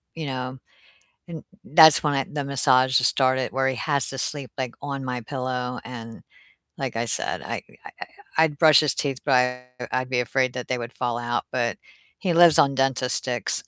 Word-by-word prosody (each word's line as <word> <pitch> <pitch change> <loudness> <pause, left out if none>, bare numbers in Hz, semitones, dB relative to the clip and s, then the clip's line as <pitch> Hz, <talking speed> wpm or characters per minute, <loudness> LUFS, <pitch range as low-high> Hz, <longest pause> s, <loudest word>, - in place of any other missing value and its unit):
you 160 -2 -5
know 130 -1 -5 0.7
And 165 -2 -8 0.2
that's 160 -1 +6
when 145 -1 +1
I 135 -1 0
the 145 -1 -3
massages 130 -2 +3
started, 130 -1 +1
where 135 0 +1
he 130 - -2
has 140 -3 -1
to 135 - -6
sleep 135 0 -4
like 125 -2 -4
on 140 -1 -5
my 125 -1 -3
pillow 125 -1 -4
and, 115 -2 -9 0.6
like - - -4
I 115 +1 -1
said, 115 - -2
I - - -5 0.2
I - - -9
I - - -5 0.3
I'd 160 -3 +3
brush 155 -3 +7
his 150 - 0
teeth 135 -3 -2
but 135 - +2
I 125 0 +1 0.2
I'd 130 0 -1
be 125 -2 0
afraid 130 +1 0
that 125 -1 -6
they 125 - 0
would 120 +1 -7
fall 120 -2 -2
out, 120 0 -2
but 120 -2 -1 0.4
he 185 -3 -1
lives 170 -1 +6
on 140 -1 +4
Dentastix. 130 -2 -1
130 Hz, 195 wpm, -24 LUFS, 125-140 Hz, 0.7 s, brush